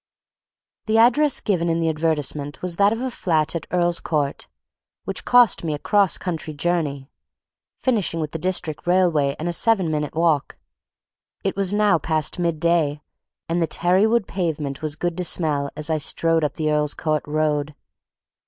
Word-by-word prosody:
The 220 +1 +2
address 255 +5 +4
given 175 -5 0
in 165 0 0
the 165 - 0
advertisement 150 -2 -2
was 175 -2 -2
that 200 +1 +4
of 225 +2 -3
a 260 0 -2
flat 160 -7 0
at 170 - -4
Earl's 175 -1 +1
Court, 145 -3 -2 0.6
which - - -4
cost 245 -7 +5
me 155 -3 -1
a - - -5
cross 200 +4 +2
country 160 -4 -5
journey, 145 -4 -2 0.7
finishing 210 -10 -1
with 155 -2 -3
the 160 - -5
District 175 -3 -3
Railway 170 -6 +2
and 160 - -4
a 175 - -1
seven 190 -3 +2
minutes' 150 -1 -3
walk. 160 -3 +1 0.9
It 195 - -1
was 195 -1 +1
now 205 -5 +3
past 155 +2 -2
mid 170 -3 -1
day, 155 -3 +1 0.4
and 170 +1 -1
the 165 - +1
tarry 180 +6 +2
wood 230 -2 +1
pavement 155 -7 -3
was 155 -1 -1
good 175 +1 -2
to 180 - -1
smell 150 -5 0
as 155 +2 -2
I 155 - +1
strode 165 +2 +1
up 150 - -1
the 155 -1 -1
Earl's 150 -1 0
Court 155 -1 -1
Road. 150 -1 -1
165 Hz, 175 wpm, -22 LUFS, 150-180 Hz, 0.9 s, cost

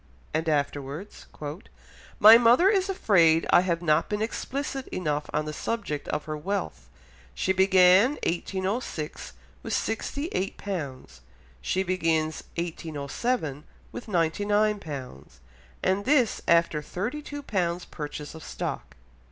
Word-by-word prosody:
And 160 +1 0
afterwards, 145 +4 -3 0.9
"My 215 +2 +10
mother 240 +10 +6
is 390 -2 +2
afraid 170 - +4
I - - +7
have 175 -2 -1
not 155 -1 +2
been 210 +1 -1
explicit 270 +3 -4
enough 150 -4 -2
on 150 0 -1
the 155 - -5
subject 200 -7 -3
of - - -3
her 155 -1 -4
wealth; 150 - -4 0.5
she 190 - +1
began 190 +5 +5
1806 190 -1 -3 0.3
with - - -5
sixty 280 +6 -2
eight 190 +2 -2
pounds; 140 - -6 0.4
she 190 - 0
begins 165 -4 0
1807 160 - -3 0.3
with - - -8
ninety 170 -1 0
nine 210 0 +2
pounds, 130 - -9 0.4
and 190 +2 +1
this 255 -3 +2
after 170 -2 +3
thirty 225 - -4
two 290 -1 -7
pounds 180 -7 -1
purchase 150 -1 -7
of 160 -1 -10
stock." - - -5
180 Hz, 125 wpm, -27 LUFS, 155-215 Hz, 0.9 s, My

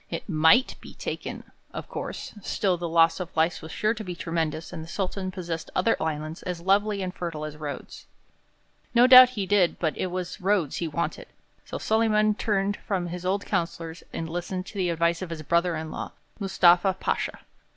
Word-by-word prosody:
It - - -5
might 165 +8 +4
be - - -12
taken, - - -5 0.3
of - - -5
course; - - -6
still 190 -1 0
the 170 -1 -4
loss 165 +1 +4
of 175 -3 -7
life 160 +1 +2
was 160 - -9
sure 215 +1 +1
to 220 -1 -7
be 180 -3 -5
tremendous 165 -2 -3
and 160 - -5
the - - -10
Sultan 190 +1 -3
possessed 175 -3 -5
other 205 +5 +3
islands 155 0 -3
as 180 -2 -4
lovely 200 +2 +2
and 180 -1 -4
fertile 165 -4 -4
as 150 -1 -7
Rhodes. 150 -2 -7 0.9
No 240 +1 +7
doubt 255 -1 +10
he 200 - 0
did; 190 -3 +3
but 160 -3 -1
it - - -2
was 180 0 -5
Rhodes 190 -6 +1
he 170 - -2
wanted, 170 +2 -3 0.4
so - - -5
Solyman 215 -1 +2
turned 205 -1 0
from 180 -4 -3
his 180 +1 -5
old 200 +2 0
councillors 170 -3 -3
and 165 - -4
listened 175 +2 -4
to - - -11
the 180 -2 +1
advice 170 +1 +1
of 185 - -5
his 160 -2 -6
brother 170 +2 +2
in 160 0 -5
law, - - -6 0.3
Mustafa 190 -1 +4
Pasha. - - -2
180 Hz, 195 wpm, -26 LUFS, 165-195 Hz, 0.9 s, doubt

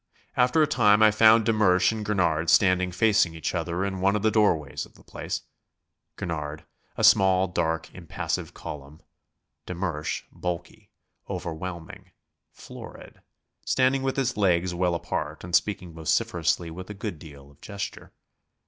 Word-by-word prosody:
After 125 +5 +3
a - - +2
time 110 -7 +4
I 110 - +7
found 110 0 +5
de 115 - +3
Mersch 95 -3 +3
and 110 -1 -4
Gurnard 85 -6 0
standing 90 -2 +4
facing 90 -3 +2
each 80 - -3
other 85 +2 -2
in 95 -1 -4
one 100 +2 +3
of 105 - -2
the 110 - +3
doorways 85 -11 +1
of - - -14
the - - -19
place - - -5 0.7
Gurnard, 75 -2 -5 0.3
a - - -2
small, 95 -1 +5
dark, 80 -2 -2
impassive 85 -5 -4
column; 75 +3 -9 0.7
de 90 - -5
Mersch, 85 -4 -3
bulky, 90 -1 -6 0.4
overwhelming, 85 0 -6 0.4
florid, - - -12 0.4
standing 130 +1 +2
with 135 0 -2
his 130 -3 0
legs 90 -3 +1
well 90 0 0
apart - - -4
and 90 0 -1
speaking 90 -4 0
vociferously 80 +1 0
with 95 +4 -9
a 105 - -6
good 100 -5 -5
deal 70 -3 -13
of 70 - -25
gesture. 100 -1 -7
90 Hz, 150 wpm, -26 LUFS, 85-105 Hz, 0.7 s, I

